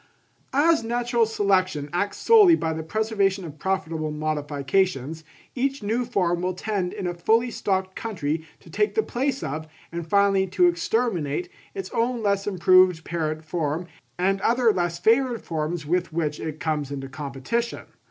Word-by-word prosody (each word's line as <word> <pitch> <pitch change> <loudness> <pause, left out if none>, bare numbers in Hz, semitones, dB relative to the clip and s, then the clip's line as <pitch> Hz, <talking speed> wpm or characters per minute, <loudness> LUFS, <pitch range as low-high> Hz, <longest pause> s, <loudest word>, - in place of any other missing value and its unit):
_—As 310 +1 +4
natural 235 0 +1
selection 185 -8 +1
acts 200 +4 -1
solely 420 -7 +7
by 160 - -1
the 160 - -4
preservation 200 +1 0
of 155 -2 -10
profitable 165 -4 -2
modifications, 150 +1 -1 0.3
each 270 -1 -1
new 230 +4 0
form 180 -7 0
will 180 0 -1
tend 190 -2 -2
in - - -5
a 175 - -1
fully 225 +8 +2
stocked 190 -3 -1
country 165 -8 -3 0.2
to - - -15
take 420 - 0
the 440 - +3
place 270 -1 -2
of, 155 +3 -4 0.2
and 170 -1 -5
finally 200 -1 +3
to 180 -1 +3
exterminate, 175 - 0 0.3
its 390 - -5
own 235 0 0
less 200 -1 +1
improved 185 -2 +4
parent 155 -2 -3
form 160 +1 -2 0.3
and 195 +2 +1
other 235 0 +3
less 175 -2 -1
favoured 235 +6 +2
forms 160 0 -3
with 175 +3 0
which 155 -2 -2
it 155 -1 -5
comes 150 -3 -1
into 135 -1 -5
competition. 140 - -3
185 Hz, 155 wpm, -24 LUFS, 160-225 Hz, 0.3 s, solely